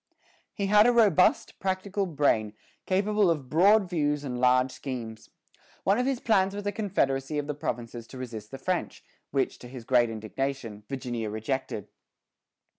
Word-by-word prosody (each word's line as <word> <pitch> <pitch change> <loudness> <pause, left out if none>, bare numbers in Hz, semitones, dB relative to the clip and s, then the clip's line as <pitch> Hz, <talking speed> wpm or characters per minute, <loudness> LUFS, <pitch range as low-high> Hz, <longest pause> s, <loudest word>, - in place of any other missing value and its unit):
He 200 - -1
had 210 +3 +6
a - - +6
robust, 205 -7 +3
practical 190 +1 -1
brain, 135 -9 +1 0.3
capable 200 +1 +2
of 145 -6 -1
broad 200 +5 +5
views 150 -4 0
and 125 -3 -4
large 125 +1 +4
schemes. 115 -6 -7 0.5
One 200 +4 +3
of 250 - +1
his 270 -3 0
plans 195 -5 +2
was 205 0 -5
a 205 - 0
confederacy 150 - -1
of 145 - -1
the 150 - -3
provinces 120 -4 -5
to 130 - -11
resist 115 -4 -7
the 135 - -7
French, 180 +5 -3 0.3
which, 135 -2 -1
to 125 - -10
his 125 -1 -9
great 120 -2 +3
indignation, 115 0 -4
Virginia 120 -5 -3
rejected. 110 0 -3
140 Hz, 160 wpm, -27 LUFS, 125-195 Hz, 0.5 s, had